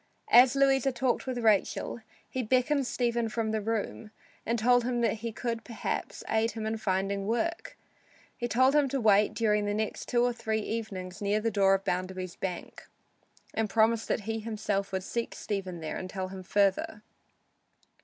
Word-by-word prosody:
As 250 Hz, +2 st, +7 dB
Louisa 270 Hz, -1 st, +3 dB
talked 250 Hz, +1 st, -1 dB
with 255 Hz, -1 st, -2 dB
Rachel, 220 Hz, 0 st, +1 dB, 0.3 s
he 260 Hz, -, -3 dB
beckoned 255 Hz, +3 st, +1 dB
Stephen 235 Hz, -2 st, 0 dB
from 220 Hz, -1 st, -1 dB
the 220 Hz, -1 st, -1 dB
room 220 Hz, 0 st, -3 dB, 0.4 s
and 230 Hz, +1 st, +1 dB
told 245 Hz, +2 st, +4 dB
him 240 Hz, 0 st, -1 dB
that 230 Hz, -1 st, +1 dB
he 230 Hz, 0 st, -3 dB
could 230 Hz, 0 st, -3 dB
perhaps 230 Hz, -, -4 dB
aid 225 Hz, +1 st, +1 dB
him 220 Hz, -1 st, -4 dB
in 220 Hz, +1 st, -1 dB
finding 195 Hz, -1 st, -1 dB
work. 330 Hz, +10 st, -2 dB, 0.6 s
He 240 Hz, -, -3 dB
told 260 Hz, +3 st, +4 dB
him 295 Hz, -2 st, +3 dB
to 275 Hz, +1 st, -1 dB
wait 210 Hz, -2 st, +4 dB
during 210 Hz, -2 st, +2 dB
the 205 Hz, 0 st, -1 dB
next 215 Hz, 0 st, -3 dB
two 240 Hz, -1 st, +2 dB
or 245 Hz, 0 st, +2 dB
three 220 Hz, -2 st, -2 dB
evenings 200 Hz, -4 st, -5 dB
near 205 Hz, +1 st, +1 dB
the 225 Hz, +1 st, -1 dB
door 195 Hz, -1 st, +4 dB
of 195 Hz, +1 st, -4 dB
Bounderby's 185 Hz, -1 st, -3 dB
bank, 180 Hz, -2 st, -6 dB, 0.7 s
and 220 Hz, -1 st, 0 dB
promised 225 Hz, +2 st, +2 dB
that -, -, 0 dB
he 225 Hz, +2 st, -3 dB
himself 210 Hz, -3 st, -2 dB
would 190 Hz, -1 st, -2 dB
seek 235 Hz, +4 st, -3 dB
Stephen 190 Hz, -4 st, -4 dB
there 155 Hz, -, -4 dB
and 185 Hz, -, -6 dB
tell 185 Hz, -1 st, -4 dB
him 190 Hz, 0 st, -7 dB
further. 200 Hz, +2 st, +1 dB
220 Hz, 180 wpm, -29 LUFS, 200-240 Hz, 0.7 s, As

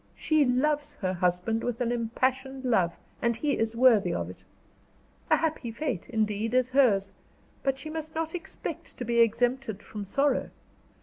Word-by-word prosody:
"She 310 Hz, -2 st, +3 dB
loves 290 Hz, +4 st, +1 dB
her 185 Hz, -3 st, -2 dB
husband 180 Hz, +5 st, 0 dB
with 240 Hz, -2 st, -2 dB
an 240 Hz, -1 st, 0 dB
impassioned 260 Hz, +3 st, -1 dB
love; 185 Hz, -9 st, +2 dB, 0.2 s
and 235 Hz, -1 st, +2 dB
he 280 Hz, +5 st, 0 dB
is 225 Hz, 0 st, 0 dB
worthy 230 Hz, -4 st, +5 dB
of -, -, -2 dB
it. -, -, -16 dB, 0.9 s
A -, -, +6 dB
happy 315 Hz, -7 st, -1 dB
fate, 240 Hz, -, -3 dB
indeed, 220 Hz, 0 st, 0 dB
is 255 Hz, 0 st, +2 dB
hers; 200 Hz, -8 st, +3 dB, 0.5 s
but 270 Hz, -1 st, 0 dB
she 310 Hz, +3 st, -7 dB
must 315 Hz, 0 st, -6 dB
not 320 Hz, 0 st, -2 dB
expect 355 Hz, -, -7 dB
to 245 Hz, -, -4 dB
be 235 Hz, 0 st, +1 dB
exempted 230 Hz, -1 st, +1 dB
from 210 Hz, -2 st, -7 dB
sorrow. 275 Hz, +6 st, +1 dB
245 Hz, 165 wpm, -28 LUFS, 220-270 Hz, 0.9 s, A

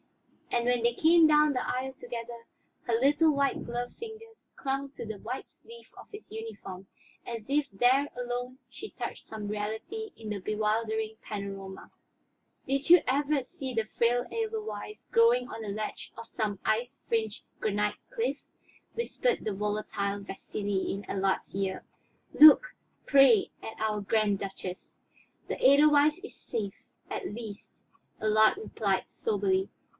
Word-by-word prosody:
And 240 Hz, -1 st, 0 dB
when 245 Hz, -1 st, +2 dB
they 235 Hz, 0 st, +3 dB
came 325 Hz, +2 st, +6 dB
down 300 Hz, -1 st, +5 dB
the 250 Hz, -, -1 dB
aisle 260 Hz, +1 st, -2 dB
together, 235 Hz, -2 st, -7 dB, 0.4 s
her 240 Hz, -, -2 dB
little 295 Hz, +5 st, +4 dB
white 280 Hz, -1 st, 0 dB
gloved 245 Hz, +1 st, -4 dB
fingers 450 Hz, 0 st, -11 dB
clung 275 Hz, +1 st, -2 dB
to -, -, -7 dB
the 220 Hz, -2 st, -6 dB
white 250 Hz, +6 st, -5 dB
sleeve 465 Hz, 0 st, -15 dB
of -, -, -12 dB
his 415 Hz, +1 st, -11 dB
uniform 205 Hz, -4 st, -8 dB, 0.4 s
as 230 Hz, 0 st, -6 dB
if 285 Hz, +1 st, +2 dB
there 255 Hz, +8 st, +3 dB
alone 245 Hz, +1 st, -4 dB
she 425 Hz, -, -8 dB
touched -, -, -6 dB
some 215 Hz, -2 st, -7 dB
reality 220 Hz, -, -4 dB
in 220 Hz, -2 st, -8 dB
the 210 Hz, -1 st, -2 dB
bewildering 220 Hz, +2 st, -1 dB
panorama. 195 Hz, -2 st, -7 dB, 0.8 s
"Did 275 Hz, +2 st, -1 dB
you 350 Hz, -1 st, +9 dB
ever 280 Hz, +1 st, +1 dB
see 260 Hz, +1 st, -6 dB
the 225 Hz, -2 st, 0 dB
frail 240 Hz, +2 st, +1 dB
edelweiss 430 Hz, -, -4 dB
growing 240 Hz, +2 st, +4 dB
on 225 Hz, -, -7 dB
a 210 Hz, -, -5 dB
ledge 215 Hz, +2 st, -5 dB
of 230 Hz, 0 st, -8 dB
some 210 Hz, -4 st, -2 dB
ice 245 Hz, +5 st, 0 dB
fringed 220 Hz, -2 st, -1 dB, 0.2 s
granite 210 Hz, -1 st, 0 dB
cliff?" -, -, -1 dB, 0.6 s
whispered 475 Hz, 0 st, 0 dB
the 215 Hz, -, -1 dB
volatile 205 Hz, 0 st, -2 dB
Vasili 200 Hz, 0 st, -3 dB
in 195 Hz, +1 st, -5 dB
Allard's 195 Hz, -1 st, -1 dB
ear. 195 Hz, -1 st, -2 dB, 0.5 s
"Look, 310 Hz, -, +8 dB, 0.3 s
pray, 270 Hz, -7 st, +6 dB
at 220 Hz, -, -8 dB
our 215 Hz, -1 st, 0 dB
Grand 205 Hz, -1 st, +1 dB
Duchess." 190 Hz, -2 st, -7 dB, 0.5 s
"The -, -, -4 dB
edelweiss 295 Hz, +2 st, +6 dB
is 420 Hz, -, -10 dB
safe, 205 Hz, -4 st, -5 dB, 0.3 s
at -, -, -3 dB
least," 215 Hz, -2 st, -8 dB, 0.5 s
Allard 215 Hz, -, +4 dB
replied 430 Hz, -, -1 dB
soberly. 385 Hz, -4 st, 0 dB
235 Hz, 145 wpm, -29 LUFS, 210-285 Hz, 0.8 s, you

